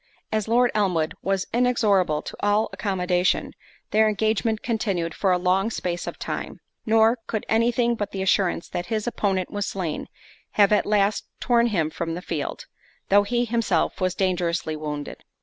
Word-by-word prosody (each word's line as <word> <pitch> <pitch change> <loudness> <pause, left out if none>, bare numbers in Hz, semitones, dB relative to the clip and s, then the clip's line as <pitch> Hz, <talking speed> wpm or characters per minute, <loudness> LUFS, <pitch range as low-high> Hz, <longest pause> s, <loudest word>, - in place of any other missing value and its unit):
As 215 -1 -1
Lord 240 +2 +3
Elmwood 180 -7 +1
was 195 0 0
inexorable 210 -10 +2
to - - -7
all 205 +2 +2
accommodation, 180 -2 0 0.4
their 215 0 +4
engagement 220 +1 0
continued 195 -8 -1
for 195 - +1
a 180 - +4
long 185 +4 +1
space 175 -6 -3
of - - -5
time; - - -5 0.3
nor 225 +2 +4
could 220 - -3
any 230 +2 +3
thing 240 0 +1
but 205 -3 -3
the 190 -1 -3
assurance 190 -3 +1
that 175 - -4
his 215 -2 -2
opponent 195 -6 -1
was 205 -1 -2
slain, 175 -6 -3 0.5
have 205 -1 +4
at 210 - +3
last 205 0 +1
torn 240 -1 +3
him 165 -8 0
from 165 0 -3
the 180 - -5
field, 150 -4 -4 0.4
though 200 +1 +6
he 240 +4 0
himself 230 -3 0
was 185 0 +1
dangerously 175 -4 0
wounded. 150 -1 -6
200 Hz, 165 wpm, -24 LUFS, 180-220 Hz, 0.5 s, though